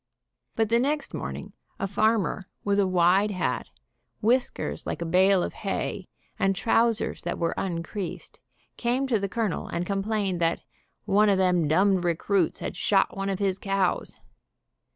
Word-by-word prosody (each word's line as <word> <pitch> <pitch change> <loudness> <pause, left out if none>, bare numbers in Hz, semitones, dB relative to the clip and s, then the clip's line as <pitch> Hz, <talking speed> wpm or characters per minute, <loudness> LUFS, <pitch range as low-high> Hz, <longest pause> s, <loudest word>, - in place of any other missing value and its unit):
But 225 -1 +1
the 235 +1 +4
next 290 +4 -1
morning - - -6 0.3
a - - -1
farmer 205 -1 +1 0.2
with 200 0 +1
a 195 - +3
wide 185 +3 +3
hat, 185 -4 -2 0.5
whiskers 245 +4 0
like - - -3
a 170 - -3
bale 185 +2 +4
of - - -4
hay, 195 -1 -3 0.3
and 195 0 +2
trousers 230 +2 +1
that - - -3
were 170 - 0
uncreased, 180 +1 -5 0.4
came 245 +3 0
to 240 -5 +1
the 200 0 -2
colonel 220 -4 -2
and 175 - -3
complained 195 -2 -1
that 165 0 +1 0.4
"one 210 +1 +4
of 195 - +3
them 180 -4 +2
dumbed 185 +4 +3
recruits 175 +1 0
had - - -4
shot 195 -2 +2
one 195 0 -2
of 195 - -1
his 195 -1 0
cows." 195 -2 -1
195 Hz, 155 wpm, -26 LUFS, 185-215 Hz, 0.5 s, the